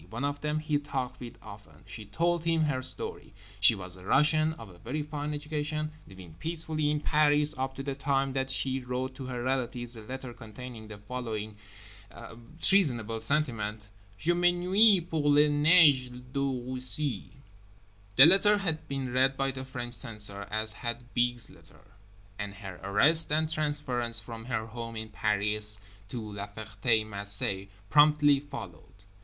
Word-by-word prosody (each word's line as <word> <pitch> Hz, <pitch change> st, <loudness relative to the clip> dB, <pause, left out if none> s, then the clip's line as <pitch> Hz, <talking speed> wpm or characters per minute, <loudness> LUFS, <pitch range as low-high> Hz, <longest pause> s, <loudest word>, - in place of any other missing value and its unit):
One 115 Hz, +5 st, -5 dB
of 145 Hz, 0 st, -3 dB
them 150 Hz, 0 st, -1 dB
he 155 Hz, -1 st, 0 dB
talked 130 Hz, -3 st, -4 dB
with 120 Hz, -1 st, -9 dB
often. 100 Hz, -1 st, -13 dB
She 110 Hz, -, -8 dB
told 170 Hz, +3 st, 0 dB
him 165 Hz, -1 st, +2 dB
her 140 Hz, -4 st, 0 dB
story. 130 Hz, -, -1 dB, 0.3 s
She 105 Hz, +3 st, +5 dB
was 90 Hz, -2 st, -6 dB
a 90 Hz, -, -13 dB
Russian, 155 Hz, +7 st, +3 dB
of 115 Hz, -8 st, -11 dB
a 90 Hz, -2 st, -16 dB
very 145 Hz, -, -4 dB
fine 150 Hz, 0 st, -5 dB
education, 150 Hz, +1 st, -3 dB, 0.2 s
living 95 Hz, -4 st, -13 dB
peacefully 160 Hz, -2 st, -1 dB
in 150 Hz, 0 st, -1 dB
Paris 150 Hz, 0 st, +2 dB
up 130 Hz, 0 st, -3 dB
to 135 Hz, -, -6 dB
the 140 Hz, 0 st, -3 dB
time 135 Hz, 0 st, -1 dB
that 135 Hz, 0 st, -2 dB
she 130 Hz, 0 st, -1 dB
wrote 125 Hz, +1 st, -4 dB
to 130 Hz, 0 st, -8 dB
her 125 Hz, -2 st, -4 dB
relatives 125 Hz, -2 st, 0 dB
a 110 Hz, -, -9 dB
letter 130 Hz, +2 st, -7 dB
containing 115 Hz, 0 st, -10 dB
the 105 Hz, -1 st, -9 dB
following 110 Hz, -1 st, -5 dB, 1.0 s
treasonable 120 Hz, -, +1 dB
sentiment: 110 Hz, -5 st, -1 dB, 0.3 s
"Je 170 Hz, +11 st, +1 dB
m'ennuie 175 Hz, +2 st, +3 dB
pour 150 Hz, -3 st, 0 dB
les 145 Hz, +1 st, +5 dB
neiges 145 Hz, -3 st, +5 dB, 0.2 s
de 140 Hz, -, -1 dB, 0.3 s
Russie." 130 Hz, -2 st, +2 dB, 0.8 s
The 135 Hz, -, +10 dB
letter 195 Hz, +4 st, +5 dB
had 160 Hz, -6 st, -3 dB
been 135 Hz, -3 st, -4 dB
read 135 Hz, +1 st, +3 dB
by 135 Hz, 0 st, 0 dB
the 130 Hz, 0 st, -7 dB
French 125 Hz, -2 st, -6 dB
censor, 105 Hz, -3 st, -1 dB
as 110 Hz, 0 st, -1 dB
had 120 Hz, +1 st, -6 dB
B.'s 120 Hz, -1 st, 0 dB
letter; 95 Hz, +4 st, -17 dB, 0.5 s
and 100 Hz, -1 st, -5 dB
her 95 Hz, -3 st, -9 dB
arrest 145 Hz, -, +4 dB
and 155 Hz, +1 st, +2 dB
transference 145 Hz, -7 st, 0 dB
from 115 Hz, 0 st, -9 dB
her 110 Hz, -3 st, -2 dB
home 115 Hz, 0 st, -7 dB
in 110 Hz, 0 st, -6 dB
Paris 105 Hz, 0 st, +3 dB, 0.3 s
to 125 Hz, -, -5 dB
La 100 Hz, 0 st, -5 dB
Ferté 110 Hz, +2 st, -1 dB
Macé 100 Hz, -2 st, -2 dB, 0.2 s
promptly 150 Hz, -1 st, +5 dB
followed. 95 Hz, -, -9 dB
130 Hz, 160 wpm, -29 LUFS, 110-150 Hz, 1.0 s, The